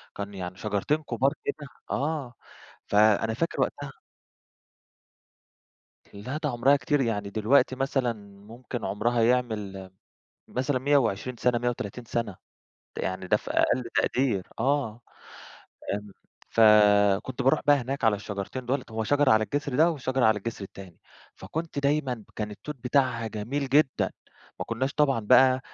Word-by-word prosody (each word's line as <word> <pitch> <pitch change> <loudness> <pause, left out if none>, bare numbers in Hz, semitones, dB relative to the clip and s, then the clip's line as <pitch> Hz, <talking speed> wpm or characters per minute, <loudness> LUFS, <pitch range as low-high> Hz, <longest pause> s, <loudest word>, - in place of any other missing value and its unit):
كان 100 0 -6
يعني 90 -1 -6
شجرتين 105 +8 0
كُبار 130 +2 +1
كده 145 -2 -4 0.2
آه 145 -3 -2 0.5
فأنا 110 +1 +3
فاكر 165 +9 -2
وقتها 145 -1 -2 2.2
لا 110 +8 -5
ده 150 - +1
عُمرها 130 +3 +3
كتير 145 0 0
يعني 105 -5 -1
دلوقتي 125 +6 +2
مثلًا 135 -2 0 0.3
ممكن 120 0 -6
عُمرها 115 +5 0
يعمل 110 -6 -1 0.6
مثلًا 130 +1 -1
120 125 -4 +1
سَنة، 125 +1 +2
130 120 -1 -3
سَنة 110 -4 -3 0.6
يعني 95 0 -3
ده - - +3
في - - -9
أقل 130 - +2
تقدير 120 -8 +1
آه. 125 -3 0 0.9
آمم، 105 -1 -7 0.4
فكنت 105 +2 +4
بارُوح 135 +1 +3
بقى 145 - +6
هناك 135 +1 -3
على 110 -2 +4
الشجرتين 105 +5 -6
دُوُل 130 +1 0
هو 110 0 -2
شجرة 145 +2 +3
على 110 0 +4
الجسر 145 +1 -3
ده 165 +3 +5
وشجرة 130 -5 0
على 110 -1 +3
الجسر 115 -3 -5
التاني، 95 -2 -12 0.4
فكنت 155 - -5
دايمًا 140 -6 0
كان 105 -1 -3
التوت 150 +8 -8
بتاعها 125 -2 0
جميل 115 +6 -3
جدًا، 140 0 +2 0.5
ما - - -3
كناش 130 +5 -2
طبعًا 140 -5 +2
بقى 130 +4 +5
120 Hz, 135 wpm, -27 LUFS, 105-135 Hz, 2.2 s, بقى